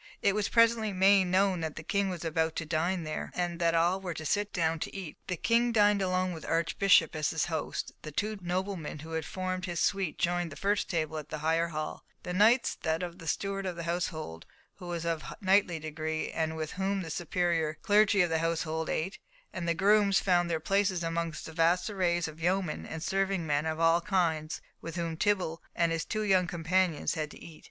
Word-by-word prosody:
It 200 - +4
was 210 0 0
presently 230 -2 +4
made 190 +1 +5
known 185 0 +2
that 160 -1 -3
the 160 - -7
King 200 +2 0
was 175 -2 -5
about 160 0 0
to 165 - -3
dine 170 +3 0
there, 155 -1 -4
and 175 -1 -2
that 170 -1 +2
all 175 +3 +2
were 180 -3 -4
to 155 - -6
sit 205 +6 0
down 165 -1 0
to - - -5
eat. 185 -6 -6
The 180 - -2
King 235 +4 +2
dined 205 -2 +4
alone 185 -1 0
with 160 - -7
the - - -8
Archbishop 165 +1 +3
as 155 -1 0
his 160 - 0
host; 160 -3 -3
the 155 - -7
two 210 +6 -2
noblemen 180 -2 -3
who 165 - -9
had 160 -1 -2
formed 185 -1 -3
his 175 -2 -3
suite 195 -4 0
joined 175 -1 0
the - - -8
first 205 +1 0
table 160 -3 -1
in 150 -1 -6
the 155 - -4
higher 165 +1 +2
hall; 155 -2 -5 0.2
the 180 - -4
knights 225 +6 +4
that 160 +2 0
of 175 +1 -6
the 165 - -9
steward 195 +3 -2
of 180 - -3
the 170 - -5
household, 165 - -3 0.3
who 180 - -9
was 170 -1 -3
of 165 -3 -1 0.2
knightly 190 -4 +3
degree, 155 0 -3
and 160 0 -1
with 155 -1 -3
whom 195 +1 -1
the 165 - -6
superior 165 -2 0
clergy 205 -1 +4
of 175 - -1
the 160 - +2
household 160 -1 -1
ate; 185 +6 -2 0.3
and 170 -2 -4
the 170 - +2
grooms 200 +1 +4
found 175 -2 +2
their 165 -1 0
places 195 +1 +1
among 165 -1 -2
the 160 - -8
vast 175 +5 +2
array 180 -4 +1
of 160 -2 -4
yeomen 180 -2 0
and 160 0 -6
serving 195 -2 0
men 150 0 0
of 160 0 -2
all 165 +1 +4
kinds 165 -5 0 0.2
with 165 0 -7
whom 165 -2 -2
Tibble 180 -3 0
and 170 -1 +2
his 165 0 -1
two 215 0 -2
young 190 -3 +3
companions 175 -1 +1
had 155 -2 -3
to - - -13
eat. 160 -2 -12
175 Hz, 220 wpm, -30 LUFS, 160-190 Hz, 0.3 s, made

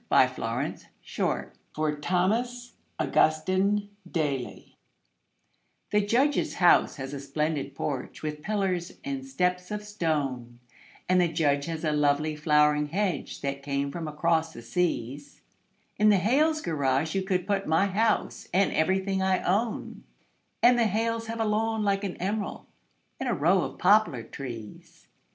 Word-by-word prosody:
The - - +5
Snowman - - -2
in - - -5
the - - -19 0.3
Yard - - -1 0.2
(For 155 -1 0
Thomas 225 +10 -1 0.3
Augustine 185 +7 +2 0.2
Daly) 145 -7 -3 1.2
The 210 - +4
Judge's 260 +8 +1
house 175 -2 +4
has 135 0 -6
a 140 - -4
splendid 150 +1 -2
porch, 135 -1 -4
with 150 -1 -4
pillars 190 -3 -1
and 275 -1 -4
steps 180 -8 -1
of 210 0 -4
stone, 145 - -2 0.5
And 185 0 +4
the 175 - +3
Judge 145 -4 +1
has 165 -1 -4
a 155 - +1
lovely 150 +1 +1
flowering 150 0 +3
hedge 180 -1 -2
that 140 0 -3
came 140 0 -2
from 165 +1 -5
across 160 +1 0
the 120 - -10
seas; 145 -2 -2 0.6
In 215 0 +5
the 205 - +5
Hales' 300 - +2
garage 145 -1 0
you 195 - 0
could 185 -2 -1
put 195 -1 -1
my 160 +5 +3
house 215 +3 0
and 190 +2 +3
everything 190 +3 +1
I 190 -1 +1
own, 210 +5 -1 0.6
And 245 0 +6
the 230 - +4
Hales 225 +2 -1
have 230 0 -5
a 225 - +1
lawn 220 +1 0
like 200 0 +1
an 195 -3 -4
emerald 205 +3 -3 0.5
and 265 - -2
a - - +1
row 175 +6 +3
of - - -5
poplar 195 - +3
trees. 115 -6 -9
180 Hz, 150 wpm, -27 LUFS, 150-210 Hz, 1.2 s, And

